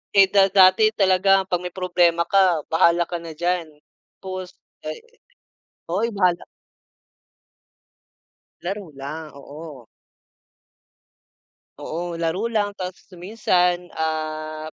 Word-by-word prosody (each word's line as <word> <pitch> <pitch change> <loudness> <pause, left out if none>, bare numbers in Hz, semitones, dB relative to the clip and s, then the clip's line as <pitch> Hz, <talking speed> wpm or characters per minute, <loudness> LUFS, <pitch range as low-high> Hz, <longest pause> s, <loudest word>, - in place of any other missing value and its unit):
eh, 195 -1 +8
da 195 -1 +5
dati 190 +2 +6
talaga 195 0 +3
pag 180 -2 -2
may 180 0 -7
problema 175 -2 +2
ka, 180 -3 +3
bahala 170 +1 +4
ka 175 0 -5
na 165 -2 -9
diyan, 175 0 -1 0.5
tapos 185 -1 -7 0.3
ay - - -3 0.9
oy 215 +7 0
bahala 180 -3 +1 2.2
Laro 195 +3 -4
lang, 150 +3 -8
oo. 145 -3 -11 1.9
Oo, 170 +1 -5
laro 180 +8 -1
lang 205 -2 0
tapos 185 -1 -7
minsan, 180 -2 0
ah, 155 0 -3
180 Hz, 100 wpm, -22 LUFS, 160-190 Hz, 2.2 s, eh